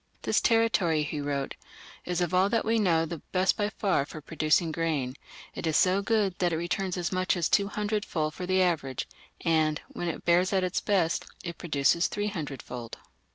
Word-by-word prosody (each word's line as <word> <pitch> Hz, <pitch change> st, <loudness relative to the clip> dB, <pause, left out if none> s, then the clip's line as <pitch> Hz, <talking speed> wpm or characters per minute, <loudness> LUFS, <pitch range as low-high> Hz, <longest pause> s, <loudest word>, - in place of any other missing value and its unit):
"This -, -, +2 dB
territory", 215 Hz, -9 st, +3 dB
he 150 Hz, 0 st, -3 dB
wrote, 140 Hz, -1 st, -2 dB, 0.5 s
"is 180 Hz, 0 st, -1 dB
of 175 Hz, 0 st, -1 dB
all 185 Hz, +2 st, +4 dB
that 230 Hz, +1 st, +1 dB
we 225 Hz, +1 st, +2 dB
know 165 Hz, -5 st, +3 dB
the 165 Hz, 0 st, -6 dB
best 185 Hz, 0 st, +3 dB
by 205 Hz, -1 st, 0 dB
far 195 Hz, -8 st, +1 dB
for 155 Hz, -, -9 dB
producing 155 Hz, +2 st, +1 dB
grain; 150 Hz, -6 st, -1 dB, 0.4 s
it 170 Hz, -, -4 dB
is 160 Hz, -, +2 dB
so 185 Hz, +2 st, +3 dB
good 210 Hz, -3 st, +1 dB
that 175 Hz, -1 st, +2 dB
it 160 Hz, -, 0 dB
returns 180 Hz, +2 st, -2 dB
as 175 Hz, -1 st, -2 dB
much 185 Hz, 0 st, +1 dB
as 170 Hz, -, +1 dB
two 200 Hz, -1 st, +3 dB
hundredfold 205 Hz, -7 st, -2 dB
for 180 Hz, +1 st, -6 dB
the 185 Hz, 0 st, +3 dB
average, 145 Hz, -8 st, -1 dB, 0.3 s
and, 155 Hz, -2 st, +2 dB
when 175 Hz, -, -5 dB
it 170 Hz, -, -4 dB
bears 180 Hz, +3 st, +3 dB
at 190 Hz, -1 st, +2 dB
its 185 Hz, 0 st, -1 dB
best, 185 Hz, -6 st, +1 dB, 0.2 s
it 170 Hz, -2 st, -6 dB
produces 155 Hz, +1 st, +2 dB
three 205 Hz, 0 st, -2 dB
hundredfold. 135 Hz, -, -6 dB
175 Hz, 195 wpm, -28 LUFS, 155-190 Hz, 0.5 s, all